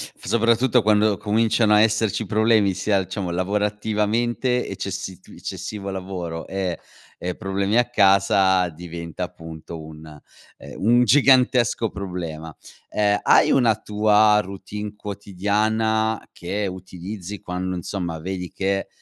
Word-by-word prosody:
f - - -16
soprattutto 115 +2 +3
quando 105 -1 +3
cominciano 110 +1 +2
a 105 - +6
esserci 110 -1 +1
problemi 110 -1 +3
sia 95 0 0
diciamo 95 -1 -4
lavorativamente, 105 +6 0
eccessi 95 -1 -5
t - - -22
eccessivo 100 -2 -6
lavoro, 90 -3 -5
e 95 -2 -3 0.4
e 90 0 -3
problemi 100 +3 -1
a 120 0 +2
casa, 95 -3 +4
diventa 85 -1 -7
appunto 80 0 -8
un, 80 0 -11 0.5
ehm, - - -11
un 120 +3 +5
gigantesco 125 -3 +4
problema. 85 -5 -6 0.3
Ehm, 105 -1 +2
hai - - +5
una 120 -5 +4
tua 105 0 +3
routine 100 +2 -7
quotidiana 105 +2 -1
che 100 +3 -3
utilizzi 95 +2 -7
quando, 90 0 -4
insomma, 85 -2 -4
vedi 90 -1 -5
che, 95 0 -1
100 Hz, 120 wpm, -22 LUFS, 90-110 Hz, 0.5 s, a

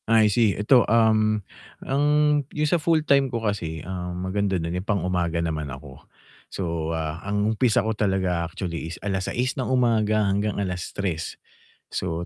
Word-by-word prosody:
I 110 -2 +5
see. 110 -3 +3
'Eto, 120 +5 +5
um, 110 -1 +4 0.5
ang 140 +2 +1 0.4
yung 150 0 -1
sa 170 0 +2
full-time 150 -4 +3
ko 115 -2 -3
kasi, 80 -7 -3
um, 90 -1 -4
maganda 95 0 0
do'n 85 0 -3
yung 95 - -15
pang-umaga 90 -4 0
naman 80 -3 -3
ako. 70 +1 -10 0.5
So, 85 -3 -3
ah, 80 0 -4
ang 105 +1 0
umpisa 110 -2 +2
ko 110 - 0
talaga 95 -4 0
actually 85 -2 -5
is 85 - -7
6:00 100 +6 -1
ng 130 - -3
umaga 110 -4 +2
hanggang 100 +1 0
3:00. 90 -3 -3 0.6
So, 85 -1 -2
100 Hz, 150 wpm, -24 LUFS, 85-110 Hz, 0.6 s, I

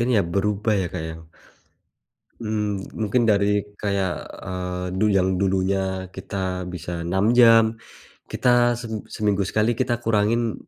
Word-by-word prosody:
ini 120 0 +2
ya - - +3
berubah 105 +4 0
ya - - -2
Kak - - -4
ya. 80 - -6 1.3
Mmm, 105 -3 -2
mungkin 110 +3 +1
dari 100 -1 +3 0.3
kayak, 100 -3 0 0.3
eee, 90 -1 -4
du 105 - +3
yang 95 0 +3
dulunya 95 -1 0
kita 95 -1 -4
bisa 90 0 -6 0.2
6 95 +3 +1
jam, 115 -1 +8 0.7
kita 120 -1 +3
sem 115 -2 -7 0.2
seminggu 100 -2 0
sekali 110 +4 +1
kita 120 -2 +1
kurangin 115 +1 +1
100 Hz, 135 wpm, -23 LUFS, 95-110 Hz, 1.3 s, jam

